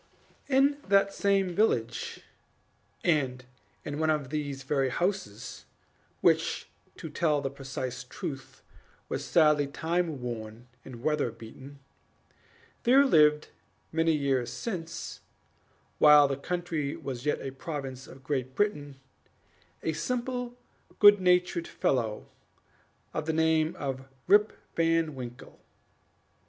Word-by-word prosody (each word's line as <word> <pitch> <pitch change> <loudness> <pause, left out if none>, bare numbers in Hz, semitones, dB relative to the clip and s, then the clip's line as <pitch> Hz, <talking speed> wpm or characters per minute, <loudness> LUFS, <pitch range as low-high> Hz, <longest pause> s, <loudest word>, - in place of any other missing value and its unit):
In 280 +1 +3
that 195 0 +4
same 195 -2 +1
village, 120 - 0 0.8
and 130 -6 +1 0.4
in 145 0 -4
one 160 0 +1
of 150 -3 0
these 145 -3 -3
very 135 -1 +1
houses 175 - -3 0.6
(which, - - +2 0.3
to - - -7
tell 150 -1 +1
the 135 -1 -3
precise 130 -2 -5
truth, 135 +1 -7 0.5
was - - -3
sadly 150 -3 +4
time 160 +1 -1
worn 115 -1 -6 0.2
and 120 -2 -10
weather 150 -4 +1
beaten), 125 +5 -12 1.0
there 265 +4 +6
lived 150 - +4 0.4
many 165 0 +2
years 135 -4 0
since, 170 -7 -5 0.8
while 150 -1 +8
the 135 - -1
country 160 -1 -3
was 130 0 -6
yet 150 - +1
a 135 - -5
province 135 -2 -6
of 130 0 -14
Great 130 -2 -2
Britain, 145 -10 -1 0.8
a 160 - 0
simple, 245 +6 -3 0.4
good 205 -1 +8
natured 180 -1 +2
fellow, 115 -5 -1 0.9
of 155 0 -3
the 160 - +1
name 160 0 +2
of 135 -1 -4 0.2
Rip 210 +1 +5 0.2
Van 165 -1 +2
Winkle. 125 -2 -9
150 Hz, 115 wpm, -29 LUFS, 135-175 Hz, 1.0 s, while